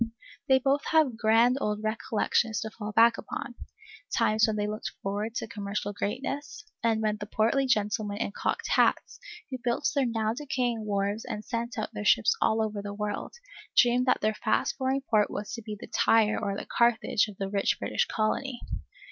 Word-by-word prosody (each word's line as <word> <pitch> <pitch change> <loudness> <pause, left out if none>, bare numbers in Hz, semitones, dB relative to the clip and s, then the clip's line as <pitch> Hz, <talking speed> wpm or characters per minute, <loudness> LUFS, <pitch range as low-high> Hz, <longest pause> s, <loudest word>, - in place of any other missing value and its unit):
They 265 - +6
both 275 +2 +1
have 310 -7 +3
grand 230 +3 +4
old 210 0 -1
recollections 220 0 0
to 220 - -5
fall 215 -1 -6
back 230 +2 +5
upon, 270 - -6 0.6
times 215 +1 +3
when 220 - -1
they 205 -1 0
looked 210 +1 -4
forward 205 +3 -3
to - - -3
commercial 205 -1 -4
greatness, 275 +8 -4 0.2
and 225 -1 +2
when 215 0 +1
the 205 - -7
portly 230 +6 +1
gentlemen 210 -2 0
in 210 - -2
cocked - - -2
hats, - - +2 0.3
who 260 - -4
built 245 +4 0
their 280 -3 +2
now 220 -1 0
decaying 245 -4 -2
wharves 205 +1 -1
and 210 0 -6
sent 235 +1 -3
out 215 - -3
their 210 - -4
ships 215 +1 +4
all 220 0 +3
over 210 -2 -3
the 205 0 -6
world, 210 0 -4 0.4
dreamed 245 +1 +5
that 255 - +3
their 215 +1 +2
fast - - 0
growing 265 +1 0
port 210 -2 +3
was 205 - -5
to 230 - -5
be 215 -1 -7
the - - -8
Tyre 220 -1 +3
or 200 -2 -2
the - - -5
Carthage 235 -2 +2
of 205 -3 -11
the 195 - -2
rich 200 0 +1
British - - 0
Colony. 240 +4 -1
220 Hz, 190 wpm, -28 LUFS, 210-240 Hz, 0.6 s, They